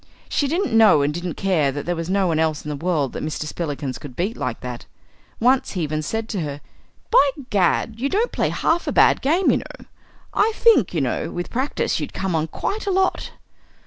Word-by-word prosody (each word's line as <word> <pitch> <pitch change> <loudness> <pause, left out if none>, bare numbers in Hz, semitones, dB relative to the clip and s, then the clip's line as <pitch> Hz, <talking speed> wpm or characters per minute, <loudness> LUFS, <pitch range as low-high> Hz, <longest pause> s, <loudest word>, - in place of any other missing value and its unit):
She 285 - 0
didn't 325 - -1
know 220 -10 +6
and 145 +1 0
didn't 175 0 -4
care 165 -8 +1
that 145 +1 -5
there 175 - -1
was 165 +1 -4
no 195 0 +2
one 165 -3 +1
else 155 -2 0
in - - -4
the 150 - -3
world 150 -8 0
that - - -5
Mr. 155 0 -3
Spillikins 145 -4 -4
could 135 -4 -10
beat 200 - -2
like - - -4
that. - - -7 0.5
Once 255 +3 +2
he 180 -4 -2
even 155 0 -2
said 220 +8 -3
to 205 - -2
her. 145 -2 -4 0.5
"By 290 - +6 0.2
Gad! 210 +3 +1
you 275 +3 0
don't 440 +8 +1
play - - 0
half 340 +1 0
a - - +1
bad - - +4
game, 335 +8 +3
you - - +2
know. - - -9 0.5
I 440 +2 +2
think 420 - +4
you 160 - +1
know, 130 - -1
with 175 0 -5
practice 260 +4 -1
you'd - - -5
come 190 -2 -2
on 160 -1 0
quite 410 - -4
a - - +2
lot." 380 0 0
180 Hz, 220 wpm, -22 LUFS, -, 0.5 s, know